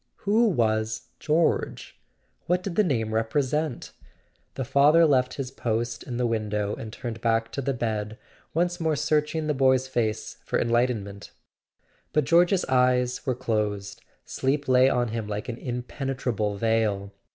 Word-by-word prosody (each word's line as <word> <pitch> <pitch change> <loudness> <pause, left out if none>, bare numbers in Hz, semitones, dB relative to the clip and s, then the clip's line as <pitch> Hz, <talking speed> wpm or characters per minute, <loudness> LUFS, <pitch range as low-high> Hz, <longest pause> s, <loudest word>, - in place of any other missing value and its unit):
Who 220 +4 +4
was 110 - 0
"George"? 160 +2 0 0.5
What 180 +1 +1
did 185 -3 -4
the 215 - +4
name 115 - -1
represent? 135 +5 -1 0.6
The 130 - -3
father 150 +6 +5
left 130 -4 +2
his 135 -2 -4
post 120 -2 -2
in 120 -3 -5
the 125 - +1
window 105 -3 -1
and 110 - -7
turned 115 -1 -6
back 115 -1 +1
to 140 - -3
the 135 0 -1
bed, 110 -2 -3 0.4
once 175 +2 +1
more 160 -2 +1
searching 155 +1 0
the 150 - +1
boy's 130 -1 +3
face 115 -4 -2
for - - -1
en¬ 120 - 0
lightenment. 110 -5 -1 0.8
But 150 - +3
George's 175 +4 +4
eyes 125 -1 +2
were 130 - +1
closed: 105 -5 -2 0.2
sleep 140 +2 -1
lay 130 0 +5
on 120 -3 +1
him 110 -1 -4
like 105 0 -4
an 115 - -4
impenetrable 125 -4 -3
veil. 105 -3 0
125 Hz, 150 wpm, -26 LUFS, 110-145 Hz, 0.8 s, father